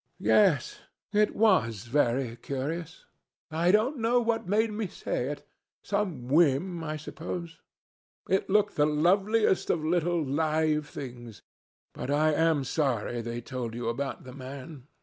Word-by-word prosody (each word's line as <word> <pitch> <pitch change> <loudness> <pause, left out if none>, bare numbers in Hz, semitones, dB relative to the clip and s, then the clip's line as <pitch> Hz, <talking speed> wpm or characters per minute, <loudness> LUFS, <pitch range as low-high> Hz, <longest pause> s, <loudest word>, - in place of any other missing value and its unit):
"Yes, 180 -11 +3 0.3
it 210 0 +3
was 150 - +3
very 120 -1 +1
curious. 145 +7 -5 0.5
I 165 +3 +1
don't 220 +9 +3
know 235 +2 +3
what 230 -2 -1
made 215 +3 +2
me 210 -1 -3
say 125 -6 -3
it. 145 +1 -6 0.4
Some 185 -12 -2
whim, 165 +4 +2
I 155 -1 -3
suppose. 165 +2 -6 0.7
It 190 +1 +1
looked 210 +1 +2
the 150 0 +4
loveliest 190 +7 +2
of 155 -2 0
little 170 -1 +1
live 155 +1 0
things. 120 -4 -9 0.5
But - - -6
I 155 +2 +3
am 160 -2 +2
sorry 125 -4 -1
they 120 +1 -5
told 120 -1 -5
you 120 -1 -2
about 135 +4 -3
the 130 - -10
man. 135 +1 -9
155 Hz, 140 wpm, -28 LUFS, 130-185 Hz, 0.7 s, the